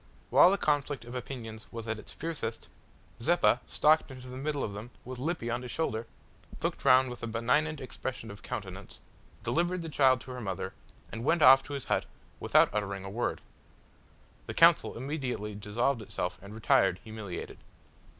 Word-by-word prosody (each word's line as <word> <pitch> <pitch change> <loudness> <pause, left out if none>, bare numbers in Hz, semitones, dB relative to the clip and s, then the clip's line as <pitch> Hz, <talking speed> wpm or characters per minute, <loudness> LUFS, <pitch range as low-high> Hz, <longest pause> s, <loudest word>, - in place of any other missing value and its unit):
While - - +8
the 200 - +2
conflict 145 -5 0
of 120 - -9
opinions 115 -4 -7
was 115 -1 -6
at 110 -1 -2
its - - -10
fiercest, 145 -9 -4 0.5
Zeppa - - +4
stalked 155 +1 +3
into 130 -1 -10
the 130 - -7
midst 145 +2 -2
of 105 - -2
them 105 +4 -7 0.2
with 125 0 -7
Lippy 140 -5 -2
on 120 +1 -1
his 125 - -7
shoulder, 115 -6 -2 0.6
looked - - -2
round 130 -1 +5
with 125 - -9
a 120 - -3
benignant 125 +7 +1
expression 130 -4 -5
of 100 - -11
countenance, 100 -5 -7 0.4
delivered 175 +1 0
the 165 - -5
child 130 -4 +4
to 130 - -9
her 125 -1 -6
mother, 95 -4 -4 0.4
and 115 - -5
went 160 +3 +3
off 135 - +9
to 145 - -7
his 140 -2 -4
hut - - 0 0.3
without - - +4
uttering 100 -2 -2
a 95 - -6
word. 120 +4 -2 1.1
The - - -5
council - - +5
immediately 125 -6 -3
dissolved 110 +5 -1
itself 90 -3 -4
and 100 +2 -10
retired 100 -4 +3
humiliated. 110 -5 -7
125 Hz, 175 wpm, -30 LUFS, 110-140 Hz, 1.1 s, off